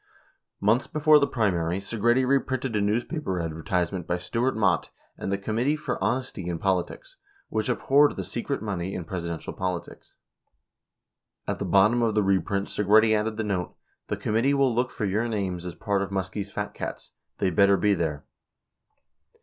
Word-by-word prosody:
Months 110 +6 +2
before 155 -1 +5
the 140 - +2
primary, 90 -7 0
Segretti 120 +5 +1
reprinted 130 -2 0
a 105 - +2
newspaper 110 - -1
adver 80 -1 -4
tisement 90 0 -1
by 90 - 0
Stewart 115 +8 -1
Mott 100 -5 +2 0.3
and - - -4
the 100 - +1
"Committee 115 +8 0
for 150 - -3
Honesty 120 -7 -2
in 85 -1 -2
Poli 95 -1 +1
tics" - - -13 0.3
which 110 +2 -1
abhorred 140 +4 +3
the - - -4
"Secret 120 +1 -3
Money 95 -3 -3
in 90 - -4
Presidential 85 -2 -5
Politics." 90 -2 -5 1.3
At - - -2
the - - -2
bottom 105 +5 +4
of 115 -2 +1
the 105 - +3
reprint 100 +1 +1
Segretti 110 +2 +4
added 110 +1 -1
the 110 - -1
note, 95 -4 -2 0.3
"The - - -2
committee 115 +6 +1
will 135 -3 +3
look 125 +2 +1
for 110 - -3
your 105 +4 0
names 95 -5 -3
as 85 - -6
part 100 -2 -1
of 100 - -2
Muskie's 95 +1 -3
fat - - -4
cats! - - -6 0.3
They 95 - +1
better 100 +3 +5
be 105 +3 +3
there!" 80 -6 -2
105 Hz, 175 wpm, -26 LUFS, 95-120 Hz, 1.3 s, before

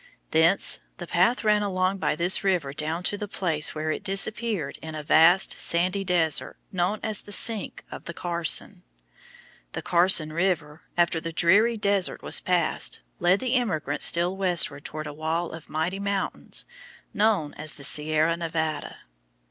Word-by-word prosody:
Thence 160 +4 +4 0.2
the 175 - -7
path 185 +9 +2
ran 210 -1 +3
along 190 -1 0
by 155 - 0
this 175 +5 +2
river 175 -8 0
down 155 +4 -3
to 205 +2 -1
the 210 - -4
place 160 -7 0
where 155 0 -2
it - - -4
disappeared 195 -4 0
in 160 -1 -7
a 155 - -5
vast 165 +5 +4
sandy 180 +3 0
desert 170 -5 0
known 185 +3 -1
as 215 -1 -2
the 205 - -13
sink 215 0 -2
of - - -9
the 170 - -6
Carson. 170 -2 +1 0.9
The - - -5
Carson 170 -3 +3
River, 165 -4 -1 0.2
after 170 -1 +2
the 165 - -5
dreary 205 +8 +3
desert 200 -3 0
was - - +2
passed, 180 -3 0 0.2
led 180 +3 +3
the 255 -1 -1
emigrants 155 - 0
still 175 +2 +1
westward 175 -7 0
toward 155 0 -6
a 150 - -6
wall 160 +3 -2
of 160 -1 -10
mighty 165 +5 -2
mountains 200 -1 -2 0.5
known 205 -8 +1
as 155 -2 -7
the 140 - -11
Sierra 155 +3 +2
Nevada. 160 -2 -3
175 Hz, 160 wpm, -25 LUFS, 155-195 Hz, 0.9 s, Thence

